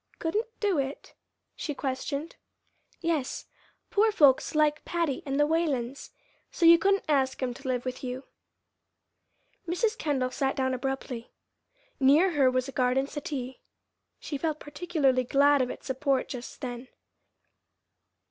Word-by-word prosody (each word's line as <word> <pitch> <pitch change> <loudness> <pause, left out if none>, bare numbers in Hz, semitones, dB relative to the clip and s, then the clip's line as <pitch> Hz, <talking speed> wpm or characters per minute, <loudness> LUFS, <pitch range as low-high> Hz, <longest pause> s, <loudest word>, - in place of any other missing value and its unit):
'Couldn't 420 +9 -1
do 400 -7 +1
it'?" 275 +1 -4 0.4
she 295 - -4
questioned. 280 +4 -3 0.7
"Yes; 325 -6 -1 0.5
poor 435 +2 +4
folks 290 -7 +4
like 305 0 +2
Patty 335 -4 -1
and 275 +1 -1
the 295 - +5
Whalens, 285 -5 -1
and - - -39 0.3
so 340 - 0
you 335 0 +9
couldn't 395 +2 +2
ask 270 -3 +1
'em 250 -1 -1
to 260 - -10
live 250 -1 -1
with 255 +1 -5
you." 255 +1 -4 1.4
Mrs. 430 +6 0
Kendall 270 - -1
sat 270 +1 -1
down 260 -1 0
abruptly. 255 -2 -4 0.7
Near 295 +8 +5
her 280 -5 +4
was 255 0 0
a - - -6
garden 255 +1 +1
settee. 275 -3 -5 0.6
She 285 - -5
felt 310 -1 -1
particularly 290 -5 0
glad 280 +2 +4
of 250 - 0
its - - -8
support 265 0 0
just 250 -1 -7
then. 245 0 -5
275 Hz, 140 wpm, -28 LUFS, 260-320 Hz, 1.4 s, you